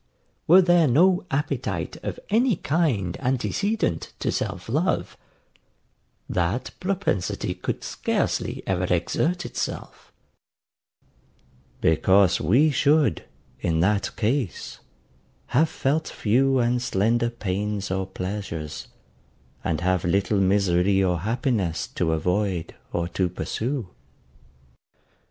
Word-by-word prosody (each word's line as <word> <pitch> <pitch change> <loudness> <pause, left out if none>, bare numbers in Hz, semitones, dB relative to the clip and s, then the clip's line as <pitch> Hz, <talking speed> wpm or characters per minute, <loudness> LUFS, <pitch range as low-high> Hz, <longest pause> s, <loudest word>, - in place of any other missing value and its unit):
Were 185 +4 +8
there 175 -2 +4
no 180 +8 +3
appetite 140 -2 -2
of - - -5
any 235 +1 +3
kind 140 - 0
antecedent 130 - -1
to - - -1
self - - -3
love, - - 0 1.1
that 90 +7 -1
propensity 185 - -1
could - - -4
scarcely - - -2
ever 90 -1 -1
exert 170 - 0
itself; - - -5 1.7
because 95 +3 +4
we 125 - +4
should, 145 - +2 0.3
in 80 +1 0
that 100 +2 +1
case, 120 - -2 0.7
have 155 +5 +4
felt 155 +1 0
few 130 +5 +2
and 120 0 +1
slender 120 0 +1
pains 105 -2 -3
or 95 0 -1
pleasures, 95 -5 -5 0.8
and 80 -2 -1
have 90 0 +1
little 100 +3 +1
misery 95 0 +3
or 90 -2 +1
happiness 110 - -1
to 80 -2 -1
avoid 90 +2 -1 0.2
or 85 0 -1
to 95 -1 0
pursue. 115 +6 -3
105 Hz, 100 wpm, -24 LUFS, 90-140 Hz, 1.7 s, Were